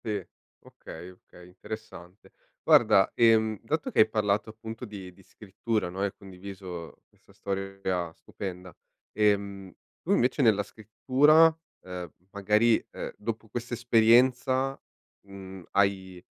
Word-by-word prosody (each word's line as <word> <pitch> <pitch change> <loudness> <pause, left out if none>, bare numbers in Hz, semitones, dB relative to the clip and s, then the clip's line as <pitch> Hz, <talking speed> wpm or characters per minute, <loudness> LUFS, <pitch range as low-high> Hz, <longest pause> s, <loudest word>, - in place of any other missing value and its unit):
Sì. 105 -2 -1 0.4
Okay, 85 +3 -11
okay 90 -1 -17
interessante. 95 -1 -11 0.3
Guarda, 95 - +5
ehm, 110 -2 +3
dato 155 +7 -2
che - - -1
hai 110 - +6
parlato 105 0 0
appunto 110 +2 -8
di 95 -4 -9
di 95 - -20
scrittura, 105 +1 -4
no, 95 +2 -6
e - - +2
hai 100 - -2
condiviso 95 -3 -10
questa - - -25
storia 95 -3 -3
stupenda, 90 -1 -8 0.4
ehm, 100 -2 0 0.3
tu - - -3
invece 125 +4 +2
nella 110 -5 +4
scrittura, 140 +10 +3 0.3
ehm, 90 -3 -7 0.2
magari, 105 +3 +2
ehm, - - -6
dopo 110 +1 -5
questa 120 +2 -5
esperienza, 125 +3 +3 0.5
mhmm, 95 -2 -10
hai 95 -2 0
100 Hz, 125 wpm, -27 LUFS, 95-115 Hz, 0.5 s, hai